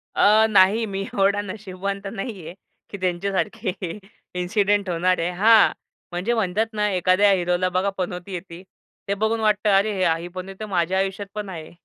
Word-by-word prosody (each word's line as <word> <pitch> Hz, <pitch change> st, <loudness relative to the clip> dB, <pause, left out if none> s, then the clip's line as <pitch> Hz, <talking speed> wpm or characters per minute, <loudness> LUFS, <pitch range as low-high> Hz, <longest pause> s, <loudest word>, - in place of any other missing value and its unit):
अ, 215 Hz, +2 st, +5 dB
नाही 205 Hz, +2 st, +4 dB
मी 195 Hz, -2 st, -4 dB
एवढा 200 Hz, +1 st, +2 dB
नशिबवान 195 Hz, -1 st, -5 dB
तर 200 Hz, -, -5 dB
नाही 200 Hz, -4 st, -6 dB
आहे 170 Hz, -, -8 dB, 0.4 s
की 200 Hz, -, -7 dB
त्यांच्यासारखे 195 Hz, +3 st, -1 dB, 0.7 s
इन्सिडेंट 200 Hz, +1 st, +1 dB
होणार 180 Hz, +1 st, +1 dB
आहे. 165 Hz, +1 st, 0 dB
हां 215 Hz, +5 st, +5 dB, 0.4 s
म्हणजे 180 Hz, +7 st, -1 dB
म्हणतात 215 Hz, -1 st, 0 dB
ना, 210 Hz, -1 st, 0 dB
एखाद्या 185 Hz, +2 st, +3 dB
हिरोला 180 Hz, 0 st, +1 dB
बघा, 185 Hz, +2 st, 0 dB
पनौती 180 Hz, +1 st, -4 dB
येते 175 Hz, 0 st, -8 dB, 0.4 s
ते 200 Hz, -, 0 dB
बघून 220 Hz, +3 st, 0 dB
वाटतं 215 Hz, -1 st, +2 dB
अरे 210 Hz, +2 st, +1 dB, 0.3 s
ही 170 Hz, -, -6 dB
पनौती 190 Hz, +3 st, -6 dB
माझ्या 185 Hz, -2 st, 0 dB
आयुष्यात 195 Hz, +1 st, -2 dB
पण 210 Hz, -2 st, -4 dB
आहे. 160 Hz, -4 st, -8 dB
195 Hz, 160 wpm, -23 LUFS, 180-210 Hz, 0.7 s, अ